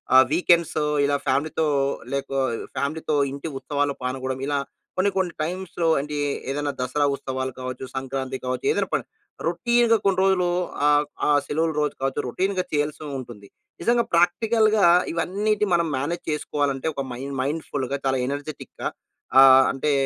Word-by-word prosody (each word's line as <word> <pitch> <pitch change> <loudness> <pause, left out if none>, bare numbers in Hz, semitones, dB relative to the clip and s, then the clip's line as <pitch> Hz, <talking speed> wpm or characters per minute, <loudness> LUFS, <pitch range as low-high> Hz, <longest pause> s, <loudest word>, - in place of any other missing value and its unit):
ఆహ్, 130 - +9
వీకెండ్స్ 170 -1 +3 0.3
ఇలా 145 - +2
ఫ్యామిలీతో 150 +4 +1 0.5
లేక 140 0 -2 0.2
ఆహ్, 120 -3 -1 0.2
ఫ్యామిలీతో 155 +2 -1 0.2
ఇంటి 140 +3 -6
ఉత్సవాల్లో 140 +1 -1
పాల్గోడం 130 +1 -3
ఇలా 145 0 0 0.4
కొన్ని, 190 +2 +3
కొన్ని 180 -3 0
టైమ్స్‌లో 175 0 -2
అంటే 150 +1 -4 0.3
ఏదైనా 145 +1 -1
దసరా 145 +3 +1
ఉత్సవాలు 130 -1 -4
కావచ్చు, 130 0 -5
సంక్రాంతి 135 0 -3
కావచ్చు 125 0 -3
ఏదైనా - - 0
పని. - - +1 0.4
రొటీన్‌గా 235 +6 +3
కొన్ని 195 -2 +3
రోజులు 190 -2 +3 0.4
ఆహ్, 145 0 +4 0.2
ఆ - - +3 0.2
సెలవుల 160 +2 0
రోజు 150 - 0
కావచ్చు, 135 0 0
రొటీన్‌గా 185 +7 -1
చేయాల్సి 150 0 -1 0.2
ఉంటుంది. 115 -5 -10 0.3
నిజంగా 235 +5 +3
ప్రాక్టికల్‌గా 215 +5 +3 0.3
ఇవన్నిటి 205 +5 0
మనం 170 -1 +1
మేనేజ్ 150 +6 -3
చేసుకోవాలంటే, 145 -1 -1
ఒక 135 - -3
మైండ్ 135 +3 -6
మైండ్‌ఫుల్‌గా 140 -2 -2
చాలా 130 -1 +1
ఎనర్జిటిక్‌గా 145 +1 -5 0.5
ఆహ్, 135 0 +9
అంటే 140 +2 -1
145 Hz, 140 wpm, -24 LUFS, 135-175 Hz, 0.5 s, ఆహ్